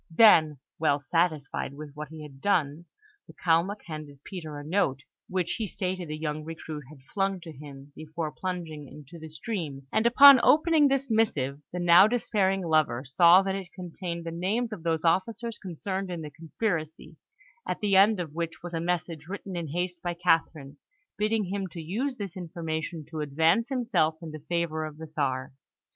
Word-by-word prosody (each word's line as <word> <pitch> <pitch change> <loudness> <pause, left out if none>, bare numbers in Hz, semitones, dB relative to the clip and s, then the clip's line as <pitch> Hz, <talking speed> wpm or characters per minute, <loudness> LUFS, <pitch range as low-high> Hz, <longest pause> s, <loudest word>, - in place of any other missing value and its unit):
Then, 160 -5 +6 0.2
well 145 -2 +2
satisfied 150 -1 -1
with 150 0 -9
what 150 0 -7
he 155 +1 -10
had 135 -2 -12
done, 170 -5 0 0.4
the - - -15
Kalmuk 175 +5 +1
handed 150 -3 -9
Peter 160 -6 -7
a 145 - -7
note, 150 -5 0 0.3
which 180 -2 -1
he 220 - -1
stated 185 -2 -3
the 155 0 -5
young 155 -1 -3
recruit 155 -2 -7
had 145 -3 -15
flung 195 -1 0
to 165 - -9
him 140 -1 -12
before 155 0 -5
plunging 165 -6 -5
into 150 +4 -12
the 160 0 -9
stream; 155 - -5
and 220 +2 +3
upon 275 +2 +9
opening 310 +2 +5
this 275 -2 0
missive, 150 -11 +1
the 180 - -5
now 175 +2 +7
despairing 200 -5 +1
lover 155 -6 +2
saw 170 +7 +6
that 195 0 -1
it 190 -2 -6
contained 175 -1 -6
the 165 - -4
names 210 +7 -1
of 195 - -7
those 165 0 -1
officers 225 +7 0
concerned 190 +1 -4
in 175 -2 -4
the 150 - -7
conspiracy, 160 0 -4 0.5
at - - -2
the 205 -3 +1
end 200 +1 +6
of 160 -4 -5
which 165 0 -4
was 175 0 -7
a 165 - -2
message 170 -2 -3
written 195 0 -6
in 170 -2 -3
haste 175 +3 -3
by 175 -1 -3
Catherine, 160 -5 0 0.4
bidding 215 +1 +1
him 195 +1 -3
to 170 -1 -9
use 235 - -3
this 200 -3 -6
information 165 -2 -5
to 160 - -5
advance 160 - +2
himself 235 - +1
in 160 - -6
the 155 -2 -9
favour 170 -2 -1
of 155 -1 -7
the 160 - -8
Czar. 135 -4 -2
170 Hz, 185 wpm, -27 LUFS, 155-195 Hz, 0.5 s, upon